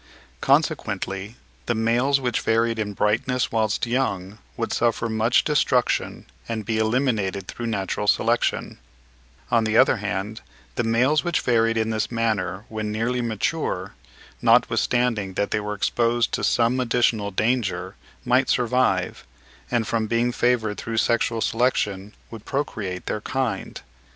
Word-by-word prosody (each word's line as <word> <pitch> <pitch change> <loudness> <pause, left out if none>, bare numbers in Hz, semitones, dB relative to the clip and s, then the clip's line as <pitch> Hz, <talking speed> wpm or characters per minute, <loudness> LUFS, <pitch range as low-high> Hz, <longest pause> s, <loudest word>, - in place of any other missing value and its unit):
Consequently 100 +3 0 0.3
the 120 - +1
males 120 +5 +2
which 125 -4 -1
varied 115 0 +1
in 105 -1 -2
brightness 120 +5 0
whilst 110 -1 0
young 105 -5 -2 0.2
would - - -2
suffer 115 0 +1
much 110 +2 +2
destruction 130 -4 +1 0.2
and 110 -2 -3
be 110 +1 -1
eliminated 110 -5 0
through 120 - -5
natural 105 -1 -2
selection; 115 +3 +1 0.7
on 115 -1 +4
the 110 0 +1
other - - +5
hand, 105 +1 -4 0.3
the 120 - -1
males 125 +7 +2
which 175 -2 0
varied 115 -1 +2
in 110 0 0
this 110 -1 -1
manner 105 -4 -1
when 110 -1 -4
nearly 115 +3 -1
mature, 110 - -2 0.5
notwithstanding 115 -6 +2
that 100 - -1
they 105 - +1
were 105 0 -4
exposed 120 +3 +1
to - - -2
some 120 +2 +2
additional 115 -4 +1
danger, 100 -3 -1 0.3
might 130 +2 +3
survive, 120 -7 +1 0.5
and 120 -2 +1
from 115 -2 0
being 115 +2 +1
favoured 120 -4 0
through 115 0 -4
sexual 115 0 +1
selection, 105 -4 0 0.2
would 115 -2 -9
procreate 105 -10 -3
their 105 - -3
kind. 125 -5 -3
115 Hz, 135 wpm, -23 LUFS, 105-120 Hz, 0.7 s, other